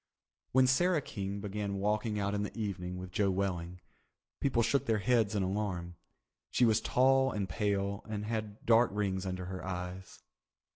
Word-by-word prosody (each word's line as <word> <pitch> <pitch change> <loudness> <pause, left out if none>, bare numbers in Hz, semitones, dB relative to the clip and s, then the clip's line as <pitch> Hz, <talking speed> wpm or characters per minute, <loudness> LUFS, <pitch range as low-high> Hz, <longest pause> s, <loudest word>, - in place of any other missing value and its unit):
When 130 0 +5
Sarah 175 +6 +3
King 100 0 -4
began 100 -1 -3
walking 105 +2 0
out 100 0 0
in 105 - 0
the 105 - -5
evening 90 -4 -3
with 90 0 -7
Joe 100 +1 +2
Welling, 90 -2 -2 0.6
people 125 -4 +2
shook 135 +4 +1
their 110 -1 +3
heads 110 -1 +2
in 100 - +1
alarm. 95 -3 -2 0.6
She 125 - +3
was 110 -1 +3
tall 135 +3 +3
and 100 -4 -2
pale 100 0 -1
and 105 -1 -3
had 110 -1 -4
dark 115 +1 +5
rings 95 -2 -1
under 90 0 -3
her 95 0 -6
eyes. 90 0 -6
100 Hz, 165 wpm, -32 LUFS, 95-115 Hz, 0.6 s, When